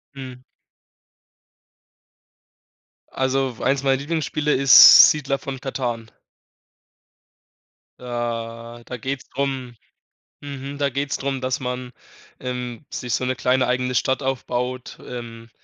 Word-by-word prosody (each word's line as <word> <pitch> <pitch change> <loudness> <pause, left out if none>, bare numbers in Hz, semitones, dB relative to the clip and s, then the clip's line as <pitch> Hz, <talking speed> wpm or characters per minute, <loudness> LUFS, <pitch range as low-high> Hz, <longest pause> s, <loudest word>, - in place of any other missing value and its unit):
Mhm. 130 -2 -9 2.7
Also, 130 -1 -1
eins 135 0 0
meiner 135 -1 +3
Lieblingsspiele 150 0 -1
ist 135 0 +9
„Siedler 135 -2 -2
von 135 -2 -7
Katan“. 120 -4 -4 1.9
Da 120 -1 -5
da 125 - -7
geht's 135 +3 -5
drum 135 -3 -3 0.7
mhm, 140 0 -7
da 140 -1 0
geht's 140 +1 -2
drum, 135 -1 -3
dass 130 0 -2
man, 125 0 -5 0.5
ähm, 125 +1 -6
sich 125 -2 -4
so 130 - -1
'ne 130 0 -1
kleine 125 +1 +1
eigene 125 0 -1
Stadt 130 +3 0
aufbaut. 130 -1 -3
Ähm, 115 -2 -9
130 Hz, 105 wpm, -22 LUFS, 125-135 Hz, 2.7 s, ist